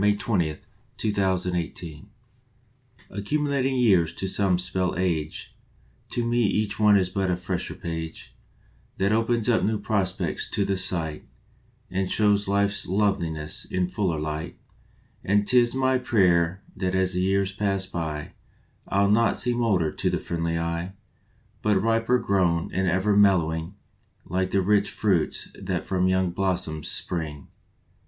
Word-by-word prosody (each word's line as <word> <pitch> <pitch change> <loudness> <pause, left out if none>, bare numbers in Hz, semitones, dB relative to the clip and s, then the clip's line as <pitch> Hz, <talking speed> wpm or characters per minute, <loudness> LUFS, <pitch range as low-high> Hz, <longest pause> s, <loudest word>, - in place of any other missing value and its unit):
March 105 0 +3
Twentieth 90 -8 -1 0.4
MELLOWING 90 -5 -2 1.0
ACCUMULATING 135 +5 0
years 95 -10 +3
to 95 - -3
some 95 -1 +2
spell 90 0 0
^ - - -6
age 85 -5 -2 0.5
To 120 - -1
me 120 +1 +1
each 105 0 0
one 105 -1 +6
is 90 -2 0
but 95 0 -1
a 90 - +1
fresher 90 0 -3
page 80 -1 -6 0.6
That 100 +1 +1
opens 115 0 +1
up 120 -2 +3
new 110 0 +1
prospects 95 -4 -1
to 100 - +1
the 100 0 0
sight 80 -5 -2 0.6
And 95 0 -1
shows 105 -1 +2
life 100 +1 +2
s 100 - -1
loveliness 85 -6 -1
in 90 -1 -2
fuller 90 -4 -1
light; 80 +3 -4 0.7
And 100 +1 +2
tis 120 +1 +4
my 130 -1 +2
prayer 90 -6 +2
that 95 -1 -1
as 95 0 +1
the 90 - 0
years 95 +1 +1
pass 95 -1 -1
by 80 -5 -5 0.5
I 100 +1 +2
ll 100 - +3
not 115 +2 +3
seem 120 0 +1
older 95 -9 +2
to - - -1
the - - 0
friendly 85 -1 -2
eye, 85 +2 -3 0.7
But 105 -2 +2
riper 115 +4 +2
grown 90 -7 +1
and 95 +1 0
ever 95 +3 +2
mellowing, 85 -3 +2 0.5
Like 95 +1 -1
the 100 -1 +1
rich 100 +1 +2
fruits 95 -7 0
that - - -2
from 95 -1 0
young 95 -1 +1
blos 95 0 0
soms 80 -2 -6
spring. 75 -5 -3
95 Hz, 150 wpm, -25 LUFS, 85-105 Hz, 1.0 s, one